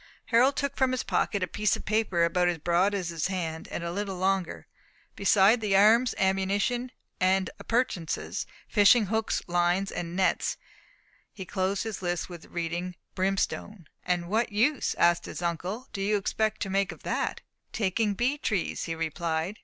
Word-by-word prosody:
Harold 255 Hz, +4 st, +4 dB
took 280 Hz, -1 st, -2 dB
from 260 Hz, -1 st, +2 dB
his 255 Hz, -, -1 dB
pocket 200 Hz, -3 st, 0 dB
a -, -, 0 dB
piece 210 Hz, +1 st, +1 dB
of -, -, -9 dB
paper 210 Hz, -5 st, +1 dB
about 175 Hz, +1 st, +2 dB
as 175 Hz, -1 st, 0 dB
broad 175 Hz, +5 st, +2 dB
as 185 Hz, -3 st, -2 dB
his 165 Hz, -1 st, -1 dB
hand, 165 Hz, -4 st, -4 dB
and -, -, -5 dB
a 170 Hz, -, -3 dB
little 195 Hz, 0 st, -3 dB
longer. 190 Hz, -1 st, -1 dB, 0.5 s
Besides 200 Hz, +3 st, +4 dB
the 200 Hz, -3 st, +2 dB
arms, 225 Hz, +5 st, +5 dB
ammunition 200 Hz, +6 st, 0 dB, 0.3 s
and 185 Hz, 0 st, +2 dB
appurtenances, 230 Hz, -9 st, -2 dB, 0.2 s
fishing 210 Hz, +1 st, +5 dB
hooks, 220 Hz, +2 st, -1 dB
lines 175 Hz, +2 st, +1 dB
and 170 Hz, 0 st, -5 dB
nets, 190 Hz, 0 st, +1 dB, 0.7 s
he 190 Hz, -, -8 dB
closed 190 Hz, +1 st, -1 dB
his 220 Hz, -4 st, -5 dB
list 175 Hz, -1 st, -2 dB
with 170 Hz, -3 st, -10 dB
reading 175 Hz, +1 st, -4 dB, 0.2 s
"brimstone." 195 Hz, -1 st, -2 dB, 0.2 s
"And 175 Hz, -1 st, -1 dB
what 220 Hz, +5 st, 0 dB
use," 245 Hz, +7 st, +1 dB
asked 170 Hz, 0 st, +3 dB
his -, -, -6 dB
uncle, 180 Hz, +8 st, -3 dB
"do 195 Hz, -, -4 dB
you 205 Hz, +2 st, +2 dB
expect 215 Hz, +2 st, -1 dB
to 195 Hz, -, -4 dB
make 195 Hz, 0 st, +1 dB
of -, -, -13 dB
that?" -, -, -2 dB, 0.3 s
"Taking 205 Hz, 0 st, 0 dB
bee 260 Hz, +7 st, 0 dB
trees," 200 Hz, -10 st, -1 dB
he 165 Hz, -, -3 dB
replied. 165 Hz, +3 st, -2 dB
195 Hz, 170 wpm, -28 LUFS, 175-215 Hz, 0.7 s, arms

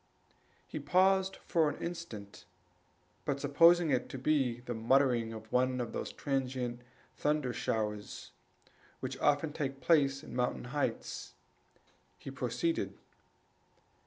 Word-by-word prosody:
He -, -, -6 dB
paused 190 Hz, +1 st, +3 dB
for 160 Hz, -3 st, +3 dB
a -, -, -6 dB
moment, 105 Hz, -, -7 dB, 0.8 s
but 140 Hz, -1 st, -1 dB
supposing 165 Hz, +3 st, +5 dB
it 125 Hz, -2 st, 0 dB
to -, -, -6 dB
be 130 Hz, -3 st, +1 dB
the 120 Hz, 0 st, -4 dB
muttering 120 Hz, 0 st, +3 dB
of 110 Hz, -1 st, -9 dB
one 130 Hz, 0 st, +2 dB
of 120 Hz, -2 st, -3 dB
those -, -, -3 dB
transient 130 Hz, -3 st, -2 dB, 0.3 s
thunder 150 Hz, -4 st, 0 dB
showers 105 Hz, -3 st, -3 dB, 0.7 s
which -, -, -5 dB
often 145 Hz, +1 st, +2 dB
take 135 Hz, -3 st, -3 dB
place 140 Hz, 0 st, +3 dB
in -, -, -9 dB
mountain 125 Hz, 0 st, 0 dB
heights, 145 Hz, -, -3 dB, 0.8 s
he -, -, -8 dB
proceeded. 335 Hz, -1 st, -1 dB
135 Hz, 120 wpm, -32 LUFS, 120-155 Hz, 0.8 s, supposing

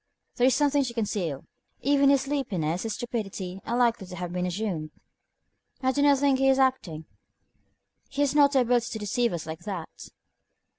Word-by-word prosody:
There 245 Hz, -, +4 dB
is 260 Hz, -, +3 dB
something 290 Hz, -1 st, +2 dB
to 235 Hz, -2 st, -6 dB
conceal. 195 Hz, -, -2 dB, 0.4 s
Even 280 Hz, 0 st, +4 dB
his 275 Hz, -1 st, +4 dB
sleepiness, 190 Hz, -, -2 dB
his 225 Hz, -2 st, -3 dB
stupidity, 195 Hz, -6 st, -5 dB
are 235 Hz, -, 0 dB
likely 235 Hz, -5 st, +1 dB
to 180 Hz, -, -8 dB
have 175 Hz, 0 st, -5 dB
been 180 Hz, 0 st, -1 dB
assumed." 180 Hz, -5 st, -3 dB, 0.9 s
"I 260 Hz, -, +3 dB
do 285 Hz, -, 0 dB
not 285 Hz, -1 st, +5 dB
think 275 Hz, -1 st, +2 dB
he 270 Hz, 0 st, +4 dB
is 265 Hz, -, +4 dB
acting; 220 Hz, -13 st, 0 dB, 1.0 s
he 280 Hz, +1 st, -3 dB
has 280 Hz, -1 st, +1 dB
not 285 Hz, -1 st, +5 dB
the 265 Hz, -, +4 dB
ability 240 Hz, -1 st, +1 dB
to -, -, -3 dB
deceive 230 Hz, +3 st, 0 dB
us 170 Hz, -2 st, -4 dB
like 160 Hz, 0 st, -6 dB
that." 180 Hz, -3 st, -7 dB
235 Hz, 185 wpm, -26 LUFS, 180-270 Hz, 1.0 s, not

